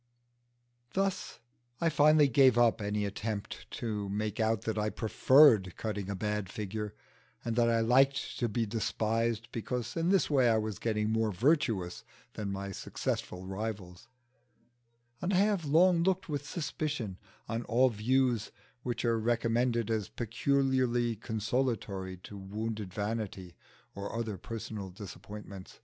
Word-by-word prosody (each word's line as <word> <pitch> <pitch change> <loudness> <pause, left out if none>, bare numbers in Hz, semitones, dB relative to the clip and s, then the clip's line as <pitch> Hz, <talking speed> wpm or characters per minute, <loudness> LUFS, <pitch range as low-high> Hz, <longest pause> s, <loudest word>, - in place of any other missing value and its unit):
Thus 195 0 -1 0.4
I 165 - +2
finally 150 -1 +5
gave 130 -1 +5
up 120 -2 +4
any 105 0 -1
attempt 105 +1 -4
to 105 -4 -3
make 105 +2 -2
out 110 -2 +1
that 110 - -1
I 105 0 0
preferred 110 - +5
cutting 105 -3 -3
a 100 - -2
bad 105 0 -2
figure, 105 +1 -5 0.5
and 115 -1 -1
that 120 -1 +3
I 115 -1 +3
liked 135 +4 +3
to 120 - +1
be 115 +2 0
despised, 115 +1 -1
because 120 +1 -3
in 165 +1 +1
this 195 0 +3
way 130 -5 +4
I 110 - +4
was 110 -3 -3
getting 110 -1 0
more 110 -1 +1
virtuous 110 - +1 0.3
than 105 -2 -4
my 100 0 -4
successful 90 -1 -4
rivals; 95 -1 -5 1.1
and 185 +2 0
I - - +4
have 200 -4 +2
long 170 +4 +5
looked 190 +1 +1
with 145 -2 -3
suspicion 150 - -3 0.3
on 115 +1 -2
all 130 +3 +4
views 120 0 +1 0.3
which 120 -1 -3
are 115 -1 +2
recommended 115 0 +1
as 110 -3 -1
peculiarly 125 0 +1
consolatory 110 -4 -2
to 105 - -9
wounded 105 0 -4
vanity 100 -3 -4 0.4
or 100 +3 -5
other 110 -5 -3
personal 110 -3 -6
disappointment. 100 0 -10
115 Hz, 140 wpm, -31 LUFS, 105-125 Hz, 1.1 s, finally